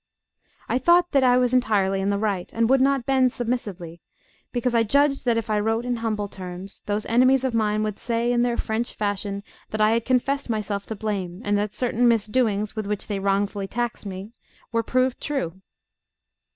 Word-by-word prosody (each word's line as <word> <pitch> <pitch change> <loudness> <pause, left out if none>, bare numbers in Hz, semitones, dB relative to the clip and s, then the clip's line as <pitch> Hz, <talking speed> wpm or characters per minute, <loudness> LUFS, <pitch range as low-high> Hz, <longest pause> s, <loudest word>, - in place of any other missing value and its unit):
I 250 - +1
thought 345 +5 +4
that 275 -1 +3
I 250 -1 +5
was 250 0 +2
entirely 200 -6 +2
in 195 - 0
the 200 - +1
right, 200 -4 -1
and 230 0 +2
would 265 -1 +5
not 270 -2 +2
bend 260 -2 +3
submissively, 205 -9 -4 0.5
because 245 0 -1
I 230 - +4
judged 275 +5 +2
that 235 -2 +2
if 230 - -2
I 215 -1 +1
wrote 225 +3 0
in 245 -1 -1
humble 215 -3 -2
terms, 185 0 -8
those 205 +1 -1
enemies 255 +3 +4
of 260 -2 0
mine 215 -1 +1
would 215 -2 -3
say 235 0 0
in 240 - +2
their 240 -1 +1
French 225 +2 -2
fashion 205 -1 -2 0.3
that 215 - -4
I 215 0 +4
had 230 0 +1
confessed 260 +2 0
myself 210 -2 -2
to 220 - -4
blame, 200 -2 -4
and 205 0 +2
that 205 0 -3
certain 245 -1 +1
misdoings 215 -2 +1
with 215 -2 -3
which 210 -1 -2
they 205 -2 -3
wrongfully 200 0 0
taxed 240 -1 -3
me 190 +2 -7 0.4
were 230 0 +1
proved 255 +2 0
true. 190 - -3
220 Hz, 195 wpm, -24 LUFS, 205-245 Hz, 0.5 s, I